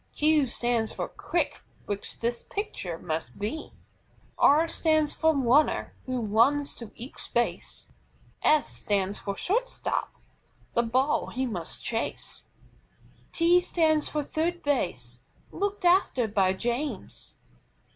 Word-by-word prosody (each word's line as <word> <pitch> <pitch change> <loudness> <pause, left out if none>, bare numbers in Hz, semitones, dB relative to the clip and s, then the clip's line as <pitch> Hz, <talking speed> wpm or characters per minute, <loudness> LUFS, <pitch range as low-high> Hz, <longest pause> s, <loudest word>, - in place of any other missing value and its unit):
Q 300 -2 +3
stands 235 -2 0
for - - -4
QUICK, - - -2 0.2
which 205 -1 -5
this 235 +1 -1
pitcher 200 - -4
must 155 -7 -4
be. 225 +10 -4 0.7
R 310 +4 +6
stands 310 -2 +2
for 320 -1 +2
RUNNER, 275 +3 +3
who 255 -1 -1
runs 235 +7 +3
to 230 -3 -8
each 245 +4 -9
base. 240 0 -2 0.5
S 305 -1 +4
stands 200 -1 -1
for 200 -1 -4
SHORT 480 +7 +1
STOP, - - -2 0.6
the 235 - +3
ball 255 +5 +1
he 260 +3 -2
must 180 -9 -5
chase. 225 -1 -4 0.9
T 345 +1 +5
stands 315 -4 +2
for 300 -1 -1
THIRD 340 +4 -2
BASE, 125 - -1 0.3
looked 405 -1 -2
after 345 - +4
by 195 -3 +2
James. 240 +8 -4
255 Hz, 125 wpm, -27 LUFS, 215-315 Hz, 0.9 s, R